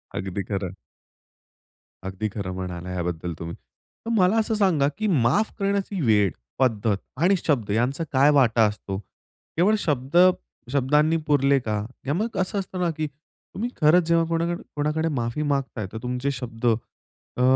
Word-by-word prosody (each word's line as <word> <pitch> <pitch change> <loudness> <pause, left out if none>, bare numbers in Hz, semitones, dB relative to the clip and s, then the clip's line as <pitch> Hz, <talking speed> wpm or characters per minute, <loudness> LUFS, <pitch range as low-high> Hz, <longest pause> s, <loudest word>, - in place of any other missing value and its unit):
अगदी 95 +1 -3
खरं. 95 -3 -2 1.3
अगदी 95 +3 -3
खरं 100 -3 -4
म्हणाला 90 -1 -5
याबद्दल 90 -1 -3
तुम्ही. 85 0 -6
तर 230 - -13
मला 190 +2 +4
असं 220 0 +1
सांगा 180 -9 +3
की 215 - 0
माफ 160 - +2
करण्याची 200 -1 -1
वेळ, 105 - +3 0.3
पद्धत, 110 -5 +2 0.2
आणि 175 +7 +3
शब्द 125 -10 +1
यांचा 125 +9 0
काय 140 +2 +5
वाटा 115 -3 +4
असतो. 105 -2 -4 0.6
केवळ 185 +6 +4
शब्द 145 -4 -1 0.6
शब्दांनी 150 +4 +3
पुरले 140 -2 +4
का? 110 -4 -2 0.2
किंवा 145 +5 0
मग 225 +1 -4
असं 185 +2 -1
असतं 185 -1 -4
ना 175 -1 +2
की 155 - -1
तुम्ही 155 - -8
खरंच 165 +3 +5
जेव्हा 165 0 +4
कोणाक 170 +1 0 0.2
कोणाकडे 150 +2 0
माफी 120 -1 -2
मागत 140 -4 -1
आहे 105 - -2
तर 110 - -5
तुमचे 125 +2 -1
शब्द 120 -3 -5
अ, 120 +2 -3
140 Hz, 155 wpm, -24 LUFS, 110-165 Hz, 1.3 s, काय